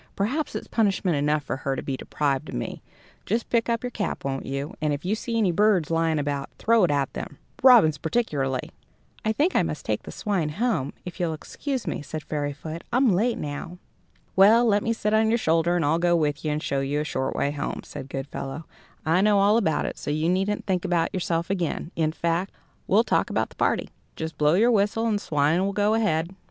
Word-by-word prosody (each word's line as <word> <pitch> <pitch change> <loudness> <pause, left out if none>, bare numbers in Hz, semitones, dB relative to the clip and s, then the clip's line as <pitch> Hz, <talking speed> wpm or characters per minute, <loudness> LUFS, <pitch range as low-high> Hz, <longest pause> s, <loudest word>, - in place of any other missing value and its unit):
Perhaps 260 +10 -1
it's - - -4
punishment 195 -6 +1
enough 150 +1 +1
for 130 - -3
her 135 0 -2
to - - -5
be 135 - -2
deprived 135 0 -2
of - - -6
me. - - -4 0.4
Just 225 +3 -2
pick 235 0 +2
up 230 +1 0
your 245 - -3
cap, 210 -10 -3
won't 135 -1 -3
you? 140 +6 -4
and 150 -1 +1
if 145 +4 -5
you 195 - +1
see 230 +1 -2
any 205 -5 +3
birds 190 -3 +2
lying 165 -1 +2
about, 145 -1 -2
throw 230 -2 +3
it - - -1
at 140 -2 0
them, 145 - -6 0.2
robins 225 - +7
particularly." 145 - -1 0.5
"I 220 - +1
think 300 +11 +1
I - - +5
must - - -4
take - - -1
the - - -9
swine 195 -8 -1
home, 220 - 0
if 180 +2 -8
you'll 165 -3 0
excuse 265 - -4
me," - - -3
said 155 +2 -6
Fairyfoot, 150 +2 -4
"I'm 250 -3 +4
late 225 +6 +1
now." 150 +4 -5 0.6
"Well, 220 +5 +6
let 205 -2 +3
me 230 - -1
sit 215 -2 -1
on 220 0 +4
your 230 - +3
shoulder 165 -3 +2
and 170 -4 +1
I'll 160 +3 +2
go 175 0 +3
with 150 -3 0
you 155 - 0
and 150 +1 -2
show 140 - 0
you 140 +2 -1
a - - -1
short 130 -3 -2
way 140 - 0
home," 145 - -4
said 135 - -8
Goodfellow; 135 +2 -5 0.4
"I 165 +4 +3
know 210 0 +4
all 200 +2 +4
about 190 -9 +1
it, - - -5
so - - -5
you 155 +3 +1
needn't 195 +3 0
think 185 -3 0
about 175 -3 0
yourself 170 -1 -1
again. 175 -2 -2
In 155 -1 +1
fact, 170 +3 -1 0.4
we'll 210 +4 +4
talk - - +1
about - - 0
the - - -18
party. - - 0 0.2
Just 160 -1 -6
blow 150 +2 +4
your 230 +6 +4
whistle, 215 +1 +2
and 215 -3 +1
the - - -11
swine 150 +4 +2
will 200 +1 -1
go 205 +2 +2
ahead." 185 -6 +1
170 Hz, 225 wpm, -25 LUFS, 150-210 Hz, 0.6 s, robins